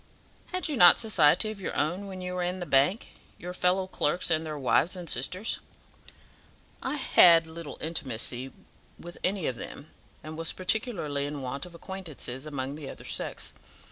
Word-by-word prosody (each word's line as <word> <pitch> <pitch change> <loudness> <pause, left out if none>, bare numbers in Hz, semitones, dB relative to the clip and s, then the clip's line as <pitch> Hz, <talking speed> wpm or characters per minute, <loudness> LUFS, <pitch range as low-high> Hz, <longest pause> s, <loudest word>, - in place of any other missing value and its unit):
"Had 365 0 -2
you 300 - -2
not 175 -7 +9
society 215 -1 +4
of 205 -2 -9
your - - -4
own 180 +7 -1
when 190 -1 -7
you 180 0 -4
were 180 - -2
in 180 +1 -1
the 180 - -4
bank 145 +9 +2 0.3
your 180 +1 -7
fellow 180 +1 +2
clerks 175 -1 -1
and 160 0 +2
their 155 -2 -5
wives 145 +6 +2
and 180 -2 -7
sisters?" 180 - 0 1.2
"I - - -2
had 170 - +6
little 160 -1 -8
intimacy 130 -4 -2 0.5
with 175 0 -10
any 190 -3 0
of 125 - -2
them, 145 +6 -9 0.3
and 155 +1 -7
was 165 - +2
particularly 180 - -1
in 145 -2 -5
want 135 +6 -4
of 175 - -14
acquaintances 160 -7 -5
among 140 -2 -3
the 145 -3 -7
other - - -10
sex. - - -2
170 Hz, 170 wpm, -28 LUFS, 145-185 Hz, 1.2 s, not